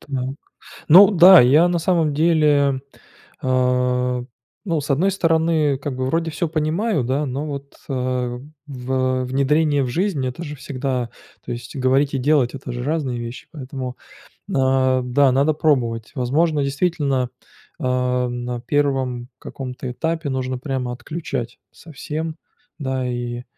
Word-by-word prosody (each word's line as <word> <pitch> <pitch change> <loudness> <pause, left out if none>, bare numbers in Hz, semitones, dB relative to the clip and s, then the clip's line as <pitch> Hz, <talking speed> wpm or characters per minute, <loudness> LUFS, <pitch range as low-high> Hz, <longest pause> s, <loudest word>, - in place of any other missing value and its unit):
так, - - -19 0.8
ну 190 +6 +9
да, 185 -1 +9
я 150 +8 +5
на 175 - 0
самом 165 -3 +1
деле, 150 -4 +3 0.6
а, 125 -1 +1 0.4
ну, 165 -6 0
с 145 - -7
одной 165 +8 +3
стороны, 160 -5 +2
как 135 -1 -5
бы 130 0 -2
вроде 165 +3 0
всё 155 +2 -2
понимаю, 160 - 0
да, 135 +5 -1
но 140 +3 -3
вот, 140 -1 -7
э, 125 -2 -2 0.3
в 130 -1 -1
внедрение 145 +3 +2
в - - -3
жизнь- 165 -1 -1
это 130 +6 -5
же 150 -1 -7
всегда 130 -3 -3 0.3
то - - -5
есть 120 +1 -8
говорить 135 +2 +2
и 135 - +1
делать- 140 -2 +2
это 130 -2 -6
же 120 0 -4
разные 140 -4 -2
вещи, 120 +1 -7
поэтому, 130 -4 -6 0.5
э, - - -4 0.5
да, 130 +2 +3
надо 140 +4 +2
пробовать. 120 -7 0
Возможно, 145 +4 +1
действительно, 140 -3 0 0.5
а, 125 -2 0
на 120 0 -4
1 130 -3 -1
каком-то 130 -1 -6
этапе 160 +3 -2
нужно 130 -1 -2
прямо 130 -2 -3
отключать 130 -4 -5
совсем, 160 +1 -6 0.4
да, 130 -3 -2
и, 120 0 -4
135 Hz, 140 wpm, -21 LUFS, 125-155 Hz, 0.8 s, ну